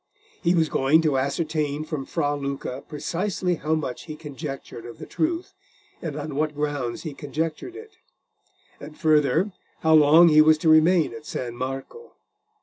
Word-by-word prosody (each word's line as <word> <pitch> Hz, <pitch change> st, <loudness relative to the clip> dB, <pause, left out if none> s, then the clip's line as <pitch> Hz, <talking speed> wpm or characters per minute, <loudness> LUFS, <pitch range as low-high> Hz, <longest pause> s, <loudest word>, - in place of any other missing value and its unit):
He 175 Hz, -1 st, +2 dB
was 160 Hz, -2 st, +3 dB
going 150 Hz, +4 st, +3 dB
to 145 Hz, -4 st, +2 dB
ascertain 150 Hz, +1 st, -1 dB
from 150 Hz, -4 st, -5 dB
Fra 145 Hz, 0 st, -1 dB
Luca 140 Hz, -1 st, -5 dB
precisely 180 Hz, +4 st, -2 dB
how 155 Hz, +2 st, 0 dB
much 140 Hz, -5 st, -4 dB
he 155 Hz, -, -7 dB
conjectured 140 Hz, -5 st, -8 dB
of 120 Hz, 0 st, -10 dB
the -, -, -8 dB
truth, 345 Hz, +4 st, -2 dB, 0.5 s
and 155 Hz, -4 st, -5 dB
on 150 Hz, 0 st, -5 dB
what 150 Hz, +1 st, -1 dB
grounds 145 Hz, -5 st, -3 dB
he 155 Hz, -4 st, -5 dB
conjectured 160 Hz, -, -4 dB
it; 440 Hz, +1 st, -12 dB, 0.8 s
and, 150 Hz, +1 st, -11 dB
further, 155 Hz, +5 st, +2 dB, 0.3 s
how 160 Hz, 0 st, +3 dB
long 155 Hz, +3 st, +7 dB
he 155 Hz, 0 st, +7 dB
was 155 Hz, 0 st, +5 dB
to 160 Hz, 0 st, +1 dB
remain 160 Hz, +2 st, +4 dB
at 150 Hz, 0 st, -10 dB
San 120 Hz, -2 st, -4 dB
Marco. 135 Hz, -, -6 dB
155 Hz, 160 wpm, -24 LUFS, 145-165 Hz, 0.8 s, long